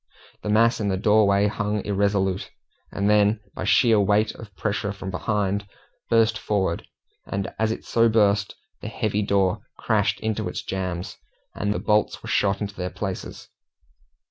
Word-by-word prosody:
The 105 - -4
mass 115 +3 +4
in 105 - -1
the 95 -1 0
doorway 105 -1 +4
hung 105 0 -1
irresolute, 100 -2 0 0.4
and 100 - -1
then 105 +1 +4
by 95 - -5
sheer 115 0 +4
weight 105 +2 +2
of 110 -3 -11
pressure 105 -1 -2
from 100 -2 -6
behind 100 +1 -1 0.4
burst 110 -1 +3
forward, 95 -5 -1 0.4
and 100 -1 -3
as 110 0 +2
it - - -5
so 115 0 +3
burst, 105 -2 +2 0.3
the - - -6
heavy 110 -2 -1
door 100 -1 +1 0.2
crashed 105 -2 +1
into 110 -1 -2
its - - -5
jambs, 90 -2 -4 0.4
and 105 - -2
the - - -1
bolts 105 0 +1
were - - -7
shot 100 0 +1
into 100 -1 -3
their 90 -2 -4
places. 95 0 -6
105 Hz, 160 wpm, -24 LUFS, 100-110 Hz, 0.4 s, mass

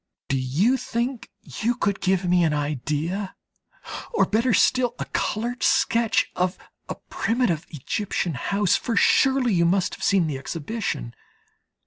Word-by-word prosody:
Do 135 - +1
you 165 - +2
think 240 0 -3
you 235 +2 -2
could 200 -4 -1
give 190 -1 +1
me 175 0 +3
an 155 -2 +2
idea, 150 +7 -2 0.8
or 465 - +3
better 230 +4 +1
still, 245 +4 +3
a - - -4
coloured 235 +3 -2
sketch 230 -1 +2
of 180 +1 0 0.3
a - - -3
primitive 225 -9 -1
Egyptian 175 +3 -2
house, 200 +8 +1
for 235 - -2
you - - -1
surely 250 -9 +3
must 180 +2 +2
have - - -8
seen 195 -4 +3
the 145 -4 -3
exhibition. 145 - -4
195 Hz, 140 wpm, -24 LUFS, 160-235 Hz, 0.8 s, me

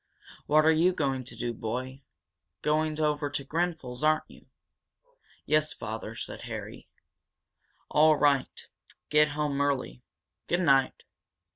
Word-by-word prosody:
What 155 +1 +4
are 160 - +6
you 170 +3 +3
going 135 -6 -1
to - - -9
do, 120 -1 -3
boy? 130 +5 -5 0.6
Going 155 0 +1
over 150 -1 0
to 140 - -3
Grenfel's, 155 -5 -3
aren't 155 0 +3
you?" - - -17 1.0
"Yes, 155 0 +2
father," 110 +1 -6
said - - -7
Harry. - - -8 1.0
"All 155 +1 +5
right. 145 -2 +1 0.4
Get 150 0 +5
home 145 -2 0
early. 135 - -1 0.5
Good 175 +1 +1
night!" 135 -5 +2
150 Hz, 125 wpm, -28 LUFS, 130-155 Hz, 1.0 s, are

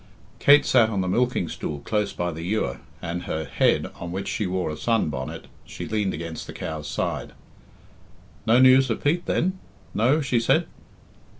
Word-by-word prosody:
Kate 145 +1 +6
sat 120 -4 +4
on 100 -4 -1
the 90 - -2
milking 120 -2 +1
stool 75 - -4
close 105 +4 -1
by 90 0 -2
the 80 0 -7
ewer, 90 - -1 0.2
and 85 +1 -4
her 80 0 -3
head, - - +2
on 85 0 -5
which 95 +2 -4
she 105 - -1
wore 90 -3 -1
a - - -4
sun 115 0 +1
bonnet, 65 -3 -5 0.2
she - - -7
leaned 105 -3 0
against 80 +1 -6
the - - -7
cow's 80 -2 -5
side. - - -3 1.1
"No 115 +2 +5
news 130 +1 +6
of 115 - -2
Pete, 170 +5 +1
then? 185 +2 0 0.3
No?" 125 +8 +3
she 130 -5 +1
said. 115 - +2
105 Hz, 180 wpm, -24 LUFS, 85-125 Hz, 1.1 s, Kate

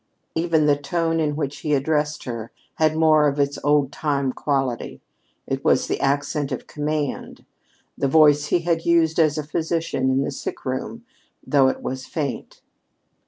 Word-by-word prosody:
Even 160 -2 +2
the 145 -1 +4
tone 165 +3 -1
in 150 -2 0
which 145 -2 -3
he 150 -1 0
addressed 150 +1 0
her 115 -3 -6 0.3
had 155 -1 +2
more 155 -2 +4
of 145 0 -1
its 140 0 0
old 145 -2 +2
time 140 -4 -1
quality. 135 -4 -2 0.5
It - - -3
was - - +3
the - - -2
accent 140 +1 0
of - - -4
command, 150 -1 -4 0.5
the - - 0
voice 150 0 +5
he 175 - +1
had 165 -1 0
used 165 -1 +2
as 155 -2 +3
a 155 - -2
physician 160 -3 -1
in 130 +1 +2
the - - -3
sick - - -6
room, 130 - -4 0.4
though 140 -2 +4
it 130 - -2
was 130 0 -5
faint. 145 -5 -5
150 Hz, 165 wpm, -22 LUFS, 140-160 Hz, 0.5 s, voice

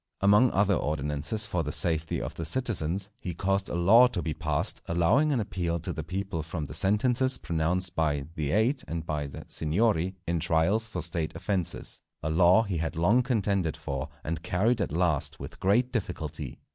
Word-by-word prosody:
Among 105 +6 +5
other 100 0 +2
ordinances 75 +6 0
for 90 -4 -1
the 75 -1 -4
safety 80 -1 +2
of - - -5
the 85 - -6
citizens, 95 -1 -1
he 90 -3 -5
caused 95 +2 -1
a - - -3
law 105 +9 +6
to 95 -8 -4
be 80 - -2
passed, - - -1
allowing 110 - +2
an 135 - +1
appeal 85 -5 -2
to 85 - -4
the 80 - -5
people 90 0 -4
from 80 0 -5
the - - -9
sentences 125 +6 +3
pronounced 85 +1 -1
by 75 -3 0
"the 75 -4 -3
Eight" 115 - +1
and 80 0 -4
by 75 -2 -3
the 70 - -10
"Signory" 95 +2 0
in 85 0 -1
trials 85 +7 +1
for 90 -6 -3
State 85 -1 -1
offences; 95 -5 0 0.2
a 80 - -1
law 90 +6 +5
he 100 -6 -3
had 80 +2 -3
long 100 +10 +3
contended 100 - -1
for, 70 -1 -5
and 80 +1 -4
carried 100 +6 +1
at 100 - -2
last 75 -3 0
with - - -9
great 120 +7 +2
difficulty. 115 -5 -4
90 Hz, 185 wpm, -27 LUFS, 80-105 Hz, 0.2 s, law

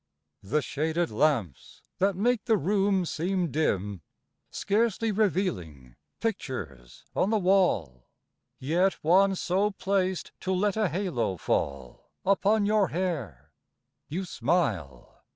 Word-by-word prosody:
II 95 - -15
The 150 - +2
shaded 160 +5 -1
lamps 115 - -1 0.2
that 195 0 +2
make 225 +3 +1
the 225 -2 +3
room 195 +2 +1
seem 175 0 -1
dim 105 - -1 0.5
Scarcely 225 +1 0
revealing 155 - -1 0.2
pictures 95 - -5
on 190 - +2
the 220 - +2
wall; 175 - +1 0.5
Yet 175 +8 +1
one 190 +4 +4
so 190 +3 +1
placed 190 -2 -1
to 190 - -3
let 200 +1 +1
a 215 -4 +1
halo 165 - -1
fall 70 -5 -3 0.2
Upon 200 +2 +3
your 210 -1 +3
hair; 155 - -4 0.6
you 185 +5 -3
smile! 95 - -2
180 Hz, 115 wpm, -27 LUFS, -, 0.6 s, one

